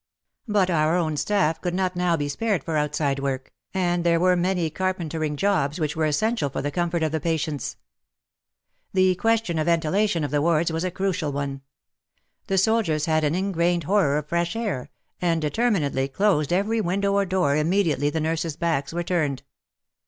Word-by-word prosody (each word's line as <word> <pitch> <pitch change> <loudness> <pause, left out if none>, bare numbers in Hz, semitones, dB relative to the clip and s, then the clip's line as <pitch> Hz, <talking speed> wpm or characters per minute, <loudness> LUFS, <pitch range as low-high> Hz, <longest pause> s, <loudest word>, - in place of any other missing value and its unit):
But 200 -4 +2
our 155 0 +2
own 160 -3 0
staff 165 -1 +1
could 175 -1 -2
not 185 -1 0
now 175 -1 +1
be 145 -1 -2
spared 200 +3 -1
for 165 - -3
outside 150 -2 0
work, 135 -1 -3 0.2
and 175 -2 0
there 170 -1 +3
were 180 +1 +4
many 175 -2 0
carpentering 165 -4 -2
jobs 155 -3 0
which 150 -2 -1
were 160 -1 +1
essential 155 +1 0
for - - -4
the 145 - -2
comfort 175 -1 -1
of 155 - 0
the 160 - -1
patients. 155 -3 -2 1.2
The 185 -1 +4
question 225 -3 0
of 155 - -1
ventilation 170 +2 +1
of 145 - -3
the 145 -1 +1
wards 165 +1 +2
was 165 +1 -2
a 185 - 0
crucial 180 -4 -2
one. 140 -1 -4 0.9
The 195 - 0
soldiers 190 -7 +2
had 155 -1 +1
an 150 +2 +1
ingrained 175 -2 0
horror 165 -4 +2
of 150 - -3
fresh 170 +4 -1
air, 205 - -3 0.3
and 170 -2 +1
determinedly 155 - 0
closed 155 0 +1
every 210 +5 +1
window 200 +2 0
or 200 0 +2
door 180 -6 +1
immediately 155 -3 +1
the 160 - -2
nurses' 160 0 -2
backs 160 -5 -1
were 175 +1 -2
turned. 155 -7 -1
170 Hz, 180 wpm, -24 LUFS, 150-185 Hz, 1.2 s, were